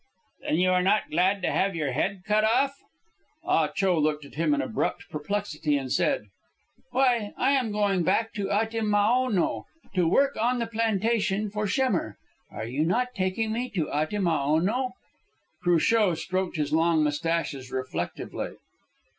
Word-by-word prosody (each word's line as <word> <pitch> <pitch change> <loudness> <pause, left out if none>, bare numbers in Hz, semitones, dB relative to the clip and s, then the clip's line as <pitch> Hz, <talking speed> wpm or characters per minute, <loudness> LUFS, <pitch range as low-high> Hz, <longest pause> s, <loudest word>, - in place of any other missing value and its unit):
"Then - - -1
you 185 +1 +3
are 180 0 +3
not 195 +4 +1
glad 185 +4 +2
to - - +1
have 195 -1 +1
your 150 -4 -1
head 185 +8 -1
cut 215 0 +2
off?" 260 +5 +3 0.7
Ah - - +2
Cho 190 -4 +1
looked 150 -1 0
at - - -14
him 165 - 0
in - - -2
abrupt 245 -6 -2
perplexity, 155 -2 -1
and 135 -2 -5
said - - +1 0.7
"Why, 245 -4 +1
I 260 +2 +2
am 260 -6 +1
going 205 -3 +1
back 225 +6 +1
to 200 -2 -3
Atimaono 220 0 +1 0.3
to 180 -3 +2
work 275 +11 +3
on 245 +2 +2
the 235 - -1
plantation 220 -2 0
for 210 0 -2
Schemmer. 195 - 0 0.3
Are 110 - -6
you 130 +6 -1
not 250 +9 0
taking 205 +3 -1
me 245 +2 -2
to 160 -5 -1
Atimaono?" 170 - 0 0.7
Cruchot 175 +2 +3
stroked 185 +1 -2
his 150 -1 -1
long 165 -1 +3
moustaches 150 -3 -2
reflectively. 130 -9 -4
195 Hz, 150 wpm, -26 LUFS, 160-225 Hz, 0.7 s, you